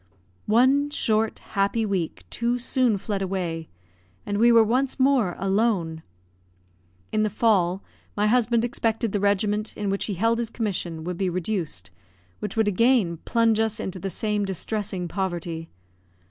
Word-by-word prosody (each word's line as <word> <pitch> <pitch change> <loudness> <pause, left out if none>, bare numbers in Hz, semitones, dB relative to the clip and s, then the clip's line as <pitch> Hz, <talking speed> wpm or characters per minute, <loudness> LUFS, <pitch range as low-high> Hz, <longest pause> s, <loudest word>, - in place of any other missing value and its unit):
One 260 +6 +4
short, 220 -6 +1 0.2
happy 200 +3 +1
week 175 - -2
too 240 +1 0
soon 245 -2 +2
fled 200 0 -3
away, 180 -4 -3 0.6
and 205 0 -2
we 235 +1 +6
were 230 -1 +7
once 255 +5 0
more 260 -9 +3
alone. 195 -5 0 1.1
In 215 - +1
the 215 - +2
fall, 195 -4 +2 0.3
my 205 - +2
husband 235 +1 +3
expected 225 -2 -1
the 205 - 0
regiment 205 +2 0
in 205 -2 -1
which 195 - -1
he 205 - -3
held 230 +5 +1
his 235 -2 -2
commission 185 -8 -3
would 175 +1 -4
be 190 -2 +1
reduced, 175 - -2 0.5
which 210 +1 -5
would 220 -1 +3
again 205 -4 +3
plunge 230 -2 +2
us 220 -1 0
into 190 0 -4
the 195 - -3
same 210 +3 -1
distressing 195 -1 -3
poverty. 170 -3 -4
210 Hz, 150 wpm, -25 LUFS, 185-230 Hz, 1.1 s, were